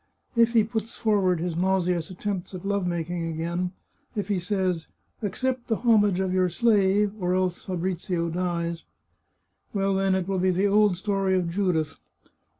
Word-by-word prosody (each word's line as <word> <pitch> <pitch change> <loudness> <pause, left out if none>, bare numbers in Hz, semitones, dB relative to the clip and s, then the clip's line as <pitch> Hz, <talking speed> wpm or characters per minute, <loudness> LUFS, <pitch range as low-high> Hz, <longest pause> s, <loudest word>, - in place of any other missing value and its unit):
If 230 0 +4
he 225 -2 +5
puts 225 +1 -4
forward 195 -6 +2
his 170 0 -2
nause 185 +1 +1
ous 175 -3 -1
attempts 190 0 -4
at 185 - -8
love 200 -2 0
making 170 0 -2
again, 170 +3 -2 0.4
if 205 -1 -3
he 200 -3 +1
says, 185 -3 -1 0.2
* - - -43
Accept 250 +5 -2
the 225 - +1
homage 210 -5 +3
of 190 -1 0
your 185 -1 +3
slave 205 0 +3
or 180 -1 +1
else 185 -1 -1
Fabrizio 175 -1 -2
dies,' 170 -1 -2 0.9
well, 195 0 +1
then 195 0 +2
it 190 -1 -1
will 195 -1 0
be 185 +1 +2
the 185 +2 +2
old 205 -2 +4
story 195 -1 0
of 175 -2 0
Judith. 170 -5 0
185 Hz, 170 wpm, -26 LUFS, 175-205 Hz, 0.9 s, he